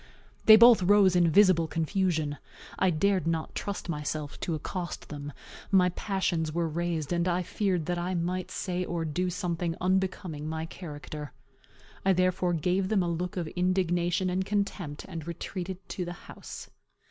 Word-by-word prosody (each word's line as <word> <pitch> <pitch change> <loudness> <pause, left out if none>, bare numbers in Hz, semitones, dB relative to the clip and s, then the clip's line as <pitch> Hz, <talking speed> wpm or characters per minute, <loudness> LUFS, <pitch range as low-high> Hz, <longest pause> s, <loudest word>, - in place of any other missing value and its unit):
They 220 - +11
both 235 -1 +8
rose 190 0 +5
in 175 -2 +4
visible 185 -2 +5
confusion. 160 -3 -1 0.4
I 190 - +4
dared 185 +2 +1
not 165 -1 -1
trust 200 -2 -4
myself 150 -2 -4
to 165 - -2
accost 175 +3 -5
them. 145 -1 -6 0.4
My 185 -2 +5
passions 175 -4 -1
were 170 +1 0
raised, 165 -1 -2
and 170 +1 +1
I 180 0 +1
feared 180 -3 -1
that 175 +1 -1
I 180 +2 -2
might 180 +1 -2
say 180 -1 -2
or 170 -2 -2
do 180 +4 -1
something 175 -2 -2
unbecoming 185 -4 -1
my 160 0 -3
character. 150 -3 -8 0.7
I 195 - +4
therefore 185 -1 +1
gave 180 +4 0
them 205 -4 +2
a - - -1
look 175 +2 -3
of 170 -3 -2
indignation 180 0 +1
and 185 +1 0
contempt, 195 -7 -2
and 165 -1 -7
retreated 180 +2 -5
to 180 - -3
the 175 0 -5
house. - - -10
175 Hz, 160 wpm, -28 LUFS, 165-185 Hz, 0.7 s, They